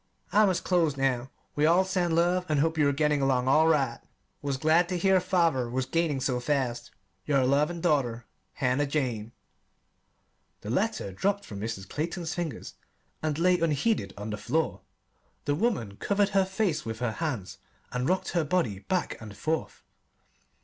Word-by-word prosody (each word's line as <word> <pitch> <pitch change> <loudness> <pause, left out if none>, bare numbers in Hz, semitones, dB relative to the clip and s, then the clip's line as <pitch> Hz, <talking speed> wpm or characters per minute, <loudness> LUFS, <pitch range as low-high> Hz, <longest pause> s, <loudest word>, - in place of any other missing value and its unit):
I 210 0 +5
must 185 -2 0
close 165 -6 +2
now. 135 -1 0 0.3
We 150 +1 +3
all 180 +3 +4
send 180 -3 0
love, 175 +2 +2
and 150 -2 +2
hope 160 +2 +2
you 150 -3 +3
are - - +2
getting 150 0 +1
along 130 -2 +2
all 155 +4 +5
right. 135 -7 +2 0.4
Was 140 -2 -2
glad 160 +5 +3
to 180 - -1
hear 190 +2 +4
father 165 -9 +1
was 130 +2 -1
gaining 165 -2 0
so 125 -1 0
fast. 125 -3 -1 0.4
Your 140 -3 +3
loving 150 +6 +1
daughter 125 -8 +1 0.3
HANNAH 130 +3 +1
JANE 125 -7 -2 1.3
The - - -5
letter 100 - -1
dropped 200 - -1
from 100 - -8
Mrs. 105 -3 -5
Clayton's 165 - -3
fingers 165 -8 -5 0.5
and 155 -2 -1
lay 180 +1 +3
unheeded 155 - 0
on 105 +2 -5
the 105 - -3
floor. 155 +10 -1 0.6
The 145 - +1
woman 145 - -1
covered 200 - +1
her 195 -1 +3
face 190 -4 -1
with 110 0 -5
her 120 -1 -1
hands 110 - -3 0.3
and 125 +1 -1
rocked 185 +1 0
her 170 -2 +1
body 145 - 0
back 185 - -2
and 105 -2 -10
forth. 160 0 -3
150 Hz, 170 wpm, -28 LUFS, 125-175 Hz, 1.3 s, I